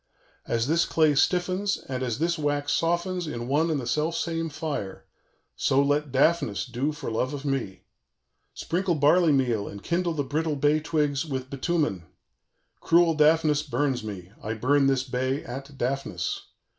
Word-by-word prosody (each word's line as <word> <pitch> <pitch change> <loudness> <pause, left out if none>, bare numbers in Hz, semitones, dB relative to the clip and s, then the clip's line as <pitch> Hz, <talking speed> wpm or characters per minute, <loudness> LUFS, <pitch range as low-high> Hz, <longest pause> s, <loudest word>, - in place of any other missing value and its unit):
_ - - -8
"As 115 0 +1
this 165 +4 +2
clay 155 -2 +3
stiffens 185 +6 +1
and 130 -1 -6
as 125 -4 -1
this 170 +3 +1
wax 145 -1 -1
softens 175 +1 0
in 120 -5 -5
one 150 +5 +2
and 155 -3 0
the 125 - -5
self 150 +7 0
same 165 -1 -2
fire, 145 -10 -5 0.5
so 135 - +2
let 145 0 +1
Daphnis 140 - +2
do 130 +4 -2
for 145 -5 -6
love 130 +5 -1
of 140 +1 -8
me. 135 -9 -3 0.7
Sprinkle 180 0 -1
barley 155 +3 +4
meal, 120 -7 +1
and 100 0 -9
kindle 170 0 0
the 145 -2 -1
brittle 150 +3 -1
bay 145 +2 +2
twigs 150 -3 0
with 130 -4 -5
bitumen. 140 - -1 0.7
Cruel 170 0 +4
Daphnis 155 -1 +3
burns 135 -3 -1
me; 95 -4 -7
I 110 +2 -3
burn 135 +5 +3
this 135 -1 +2
bay 130 +1 -2
at 135 +3 -8
Daphnis. 125 -9 -2
145 Hz, 165 wpm, -26 LUFS, 130-160 Hz, 0.7 s, barley